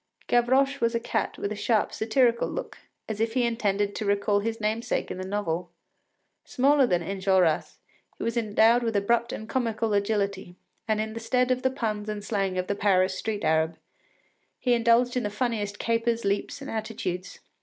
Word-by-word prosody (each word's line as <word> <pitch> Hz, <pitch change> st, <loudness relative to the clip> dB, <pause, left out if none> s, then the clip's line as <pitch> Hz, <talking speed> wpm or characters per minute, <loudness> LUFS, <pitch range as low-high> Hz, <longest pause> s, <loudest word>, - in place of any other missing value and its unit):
Gavroche 260 Hz, +3 st, +2 dB
was 230 Hz, 0 st, +1 dB
a -, -, +2 dB
cat 230 Hz, -, -2 dB
with 200 Hz, -, -3 dB
a -, -, -2 dB
sharp, 215 Hz, +1 st, +1 dB
satirical 235 Hz, +1 st, +2 dB
look, -, -, -6 dB, 0.3 s
as 220 Hz, -1 st, -4 dB
if 225 Hz, +1 st, 0 dB
he 250 Hz, -2 st, +3 dB
intended 205 Hz, -3 st, 0 dB
to -, -, -4 dB
recall 205 Hz, 0 st, +2 dB
his 225 Hz, +2 st, -3 dB
namesake 220 Hz, +3 st, -1 dB
in 185 Hz, -, -5 dB
the -, -, -3 dB
novel. 180 Hz, -4 st, -2 dB, 0.7 s
Smaller 275 Hz, +1 st, +3 dB
than 175 Hz, -5 st, +1 dB
Enjolras, 190 Hz, -3 st, +1 dB, 0.4 s
he -, -, -5 dB
was 230 Hz, -, -1 dB
endowed 225 Hz, +1 st, +4 dB
with 225 Hz, -2 st, -1 dB
abrupt 235 Hz, +4 st, +1 dB
and 220 Hz, -, -6 dB
comical 225 Hz, -3 st, -1 dB
agility, 200 Hz, -3 st, -1 dB, 0.3 s
and 215 Hz, -1 st, +1 dB
in 220 Hz, 0 st, -2 dB
the 230 Hz, -, -5 dB
stead 250 Hz, +2 st, +1 dB
of 255 Hz, 0 st, +1 dB
the 260 Hz, -, +2 dB
puns 215 Hz, -5 st, -3 dB
and 210 Hz, -1 st, -4 dB
slang 195 Hz, -4 st, -1 dB
of 180 Hz, -, 0 dB
the 200 Hz, -, -1 dB
Paris 190 Hz, -2 st, +2 dB
street 210 Hz, +1 st, -3 dB
Arab, 160 Hz, +1 st, +1 dB, 0.8 s
he 245 Hz, -, +1 dB
indulged 235 Hz, +1 st, +3 dB
in 250 Hz, -, +1 dB
the 210 Hz, -, -2 dB
funniest 210 Hz, -2 st, -2 dB
capers, 230 Hz, 0 st, 0 dB
leaps, 200 Hz, +7 st, -1 dB
and 280 Hz, -, -6 dB
attitudes. 215 Hz, -5 st, -4 dB
220 Hz, 185 wpm, -26 LUFS, 200-235 Hz, 0.8 s, endowed